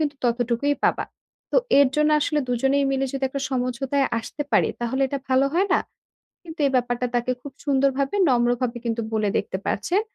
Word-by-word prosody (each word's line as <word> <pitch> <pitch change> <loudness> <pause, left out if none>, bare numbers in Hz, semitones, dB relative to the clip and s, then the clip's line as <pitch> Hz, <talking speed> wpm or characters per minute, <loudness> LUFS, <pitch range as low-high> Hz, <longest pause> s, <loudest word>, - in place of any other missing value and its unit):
কিন্তু 295 -2 -1
ততটুকুই 245 +4 +1
পাবা। - - +2 0.5
তো - - +1 0.2
এর 280 - +6
জন্য 300 0 +3
আসলে 300 +1 0
২ 245 - +1
জনেই 275 +1 +3
মিলে 270 0 0
যদি 270 0 -2
একটা 275 +1 -4
সমঝোতায় 265 +2 0
আসতে 290 +6 -5
পারি, - - +4
তাহলে 260 +3 -1
এটা 280 +1 -3
ভালো 260 +1 +3
হয় 375 +4 +3
না?" - - +4 0.6
কিন্তু 330 -2 -11
এই - - +1
ব্যাপারটা 245 0 0
তাকে 240 +1 0
খুব 280 0 -9
সুন্দরভাবে, 275 +2 +1
নম্রভাবে 245 0 +1
কিন্তু 230 0 -1
বলে 215 -2 +1
দেখতে 190 - -3
পারছেন। 350 - 0
265 Hz, 185 wpm, -23 LUFS, 245-280 Hz, 0.6 s, এর